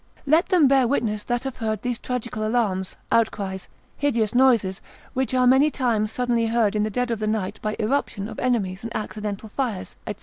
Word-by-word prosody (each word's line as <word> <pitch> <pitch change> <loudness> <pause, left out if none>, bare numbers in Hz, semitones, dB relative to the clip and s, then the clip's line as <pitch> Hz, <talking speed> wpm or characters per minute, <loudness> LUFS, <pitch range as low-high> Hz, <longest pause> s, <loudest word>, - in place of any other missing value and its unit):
Let 315 +6 +3
them 350 -7 +5
bear 265 -2 +4
witness 220 -5 0
that 240 +1 -1
have 270 -2 -5
heard 220 -3 -2
those 245 -2 -2
tragical 240 -3 -3
alarms, 215 -5 0 0.2
outcries, 200 -4 0 0.3
hideous 235 -7 +1
noises, 235 -7 +3 0.3
which 260 0 0
are 255 0 +4
many 265 +4 +5
times 230 -7 0
suddenly 240 -1 0
heard 225 -2 +2
in 210 - +2
the 215 - 0
dead 245 +3 -1
of 230 - -1
the 215 - -1
night 215 -3 -2
by 215 0 -2
irruption 215 -3 -1
of - - -8
enemies 205 -7 0
and 230 - -6
accidental 210 0 -4
fires, 225 -6 -3
&c. 210 - -3
230 Hz, 195 wpm, -24 LUFS, 210-250 Hz, 0.3 s, them